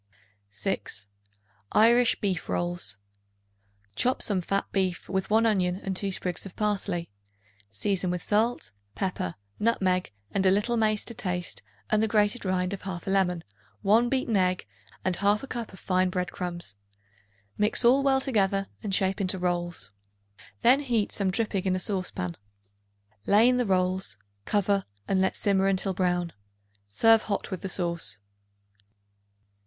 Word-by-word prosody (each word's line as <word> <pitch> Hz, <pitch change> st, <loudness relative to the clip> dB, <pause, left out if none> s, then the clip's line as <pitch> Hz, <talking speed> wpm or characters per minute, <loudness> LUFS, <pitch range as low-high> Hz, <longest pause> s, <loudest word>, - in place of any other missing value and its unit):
6. 100 Hz, 0 st, -2 dB, 0.7 s
Irish 235 Hz, +2 st, +5 dB
Beef 190 Hz, -5 st, -2 dB
Rolls. 175 Hz, -, -1 dB, 1.0 s
Chop 255 Hz, -, +1 dB
some 195 Hz, -4 st, +2 dB
fat 195 Hz, +3 st, -1 dB
beef 185 Hz, -2 st, -1 dB
with 190 Hz, 0 st, -2 dB
1 220 Hz, +2 st, +4 dB
onion 185 Hz, -5 st, +2 dB
and 190 Hz, 0 st, -4 dB
2 195 Hz, +1 st, 0 dB
sprigs 180 Hz, -2 st, -2 dB
of 195 Hz, -, -9 dB
parsley. 200 Hz, -5 st, -1 dB, 0.6 s
Season 180 Hz, -, -1 dB
with 180 Hz, -1 st, -2 dB
salt, 215 Hz, -, 0 dB, 0.2 s
pepper, 185 Hz, -, -2 dB, 0.2 s
nutmeg 185 Hz, -, +1 dB, 0.2 s
and 195 Hz, -, 0 dB
a 190 Hz, -, +5 dB
little 205 Hz, +5 st, +2 dB
mace 215 Hz, -2 st, +1 dB
to 235 Hz, -, 0 dB
taste 180 Hz, -4 st, -3 dB, 0.3 s
and 215 Hz, 0 st, +3 dB
the 220 Hz, -, +2 dB
grated 210 Hz, +2 st, +2 dB
rind 185 Hz, 0 st, 0 dB
of 200 Hz, -, -6 dB
1/2 185 Hz, -2 st, -6 dB
lemon, 190 Hz, -3 st, +1 dB, 0.4 s
1 225 Hz, +4 st, +4 dB
beaten 255 Hz, -4 st, 0 dB
egg 185 Hz, -1 st, +1 dB, 0.4 s
and 185 Hz, -1 st, +1 dB
1/2 205 Hz, +6 st, +1 dB
cup 235 Hz, -3 st, -5 dB
of 190 Hz, -, -13 dB
fine 185 Hz, 0 st, +1 dB
bread 180 Hz, -1 st, -2 dB
crumbs. 175 Hz, -, -2 dB, 0.8 s
Mix 210 Hz, +3 st, +2 dB
all 260 Hz, +4 st, +6 dB
well 270 Hz, -1 st, +3 dB
together 195 Hz, -7 st, +1 dB, 0.2 s
and 200 Hz, -3 st, -1 dB
shape 190 Hz, +1 st, 0 dB
into 190 Hz, 0 st, +1 dB
rolls. 175 Hz, -, -2 dB, 0.7 s
Then 250 Hz, +4 st, +6 dB
heat 235 Hz, -7 st, 0 dB
some 195 Hz, -2 st, 0 dB
dripping 200 Hz, -1 st, 0 dB
in 185 Hz, -1 st, +2 dB
a -, -, -1 dB
saucepan; 180 Hz, -, -2 dB, 0.9 s
lay 210 Hz, +4 st, +6 dB
in 250 Hz, 0 st, +3 dB
the 245 Hz, -, +1 dB
rolls; 185 Hz, -, 0 dB, 0.3 s
cover 200 Hz, -1 st, +1 dB, 0.2 s
and 190 Hz, -1 st, +2 dB
let 190 Hz, -, +1 dB
simmer 195 Hz, -1 st, +2 dB
until 195 Hz, 0 st, 0 dB
brown. 180 Hz, -2 st, 0 dB, 0.5 s
Serve 225 Hz, -, +5 dB
hot 205 Hz, -1 st, -3 dB
with 185 Hz, -, -4 dB
the 190 Hz, -, -4 dB
sauce. 170 Hz, -, -1 dB
195 Hz, 150 wpm, -27 LUFS, 180-215 Hz, 1.0 s, all